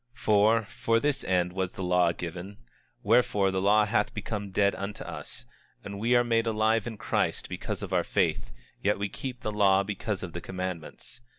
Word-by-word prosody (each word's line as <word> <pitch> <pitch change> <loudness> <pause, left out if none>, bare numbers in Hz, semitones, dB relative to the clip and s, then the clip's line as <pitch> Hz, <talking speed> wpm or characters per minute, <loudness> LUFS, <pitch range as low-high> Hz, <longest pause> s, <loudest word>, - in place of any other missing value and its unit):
25:25 - - -25
For, 110 +2 +4
for 115 +2 0
this 145 +2 0
end 90 -1 +1
was 95 -1 -2
the 95 - -5
law 90 -1 +3
given; 90 +4 -7 0.5
wherefore 105 -3 +3
the 95 0 -1
law 105 +2 +4
hath 105 -1 0
become 105 -1 -4
dead 100 +1 +2
unto 100 +2 -5
us, - - -8 0.4
and 100 0 -7
we 120 +3 +2
are 120 - +5
made 115 -1 +1
alive 110 0 +1
in 110 -2 -6
Christ - - -1
because - - -5
of - - -5
our - - +3
faith; - - 0 0.3
yet 105 +1 +2
we 100 0 -2
keep 125 +2 -6
the 105 - -2
law 100 -2 +4
because 100 0 -3
of 85 -3 -6
the 85 - -5
commandments. 95 +6 -6
100 Hz, 195 wpm, -28 LUFS, 95-110 Hz, 0.5 s, are